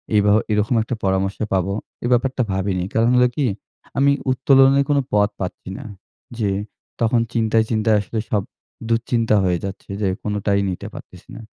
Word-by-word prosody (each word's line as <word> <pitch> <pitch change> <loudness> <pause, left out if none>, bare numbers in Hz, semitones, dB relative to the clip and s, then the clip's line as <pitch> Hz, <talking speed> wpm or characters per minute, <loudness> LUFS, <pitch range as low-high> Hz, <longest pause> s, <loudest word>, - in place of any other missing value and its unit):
এইভাব 105 0 +4 0.2
এরকম 105 +3 +1
একটা 120 - -3
পরামর্শ 95 +1 0 0.2
পাবো 95 +1 +1 0.3
এই 120 - 0
ব্যাপারটা 130 +2 +1
ভাবিনি। 95 -1 -1
কারণ 115 +1 +3
হলো 125 0 +5
কি 145 - +1 0.5
আমি 140 +1 +4 0.2
উত্তোলনের 135 +1 +5
কোন 145 - +3 0.2
পথ 105 0 +4
পাচ্ছি 90 0 -5
না। 140 - -9 0.5
যে 105 -3 +1 0.5
তখন 115 +1 +3
চিন্তায়, 110 -1 +2
চিন্তায় 110 -1 +3
আসলে 110 +3 -4
সব 105 - +2 0.5
দুঃচিন্তা 115 -1 +1
হয়ে 90 -2 +1
যাচ্ছে 95 0 -8
যে 100 - +1
কোনটাই 100 -1 0
নিতে 90 - -5
পারতেছি - - -12
না। - - -8
110 Hz, 160 wpm, -21 LUFS, 100-120 Hz, 0.5 s, হলো